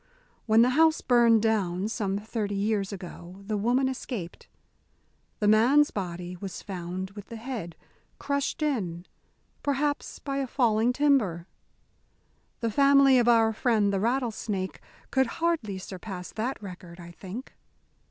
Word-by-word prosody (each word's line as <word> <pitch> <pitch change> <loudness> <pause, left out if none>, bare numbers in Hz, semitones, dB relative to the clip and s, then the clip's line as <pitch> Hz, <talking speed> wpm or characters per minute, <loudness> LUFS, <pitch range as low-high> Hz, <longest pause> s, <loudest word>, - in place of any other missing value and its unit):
When 220 +1 +6
the 250 - +3
house 320 +3 +4
burned 235 -3 +4
down 200 -4 0
some 200 -3 -2
thirty 210 -1 -3
years 200 0 0
ago, 180 -2 -9
the 215 +1 -2
woman 245 +6 +2
escaped. 245 -9 -6 0.9
The 210 - 0
man's 250 +8 +5
body 180 -2 -5
was 190 +1 -7
found 185 0 -5
with 205 0 -10
the 230 - -8
head 225 -8 -6 0.4
crushed 280 +3 -2
in 185 - -2 0.6
perhaps 285 +1 -1
by 275 -1 -4
a 275 -1 -1
falling 235 -2 +2
timber. 250 - +2 1.2
The 230 -1 0
family 275 +1 +6
of 240 - +2
our 225 -2 +5
friend 215 -3 +2
the 195 - +1
rattlesnake 220 -4 -2 0.3
could 265 -1 +3
hardly 325 - 0
surpass 185 -1 -7
that 235 +5 -3
record, 180 -2 -10
I 170 0 -10
think. 195 +9 -9
220 Hz, 135 wpm, -27 LUFS, 190-255 Hz, 1.2 s, When